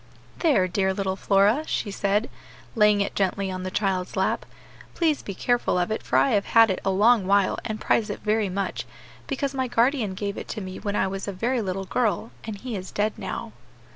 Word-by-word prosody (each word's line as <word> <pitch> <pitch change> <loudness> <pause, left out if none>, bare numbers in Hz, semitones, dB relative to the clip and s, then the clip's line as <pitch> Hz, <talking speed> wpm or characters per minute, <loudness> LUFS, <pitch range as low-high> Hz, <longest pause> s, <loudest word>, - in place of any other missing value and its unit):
"There, 275 - +3
dear 190 +1 0
little 190 -1 -1
Flora," 200 +8 +3
she 205 - -2
said, 200 +3 0 0.5
laying 210 -3 +4
it 200 - -1
gently 195 0 0
on 185 0 -4
the 185 - -3
child's 185 -2 -1
lap, - - 0 0.5
"please 320 -4 +1
be 195 - -6
careful 245 -3 +1
of 180 +3 0
it 220 - -1
for - - 0
I 275 - +4
have 205 -3 +2
had 225 -2 +8
it 185 - -3
a 195 - +1
long 205 +1 +4
while, 200 -1 +3
and 215 0 -4
prize 215 -1 +1
it 205 - -4
very 215 -1 +1
much, 195 +1 -3 0.4
because 275 0 -2
my 260 -1 -1
guardian 235 -4 +1
gave 200 +1 -3
it - - -8
to 220 - -5
me 185 -2 -7
when 205 -1 -3
I - - +2
was 195 +1 -4
a - - -1
very 235 +6 -1
little 195 -1 -3
girl, 225 +1 0
and 220 -2 -5
he 245 +2 -5
is 185 -1 -6
dead 210 +1 0
now." - - -5
205 Hz, 215 wpm, -25 LUFS, 190-230 Hz, 0.5 s, had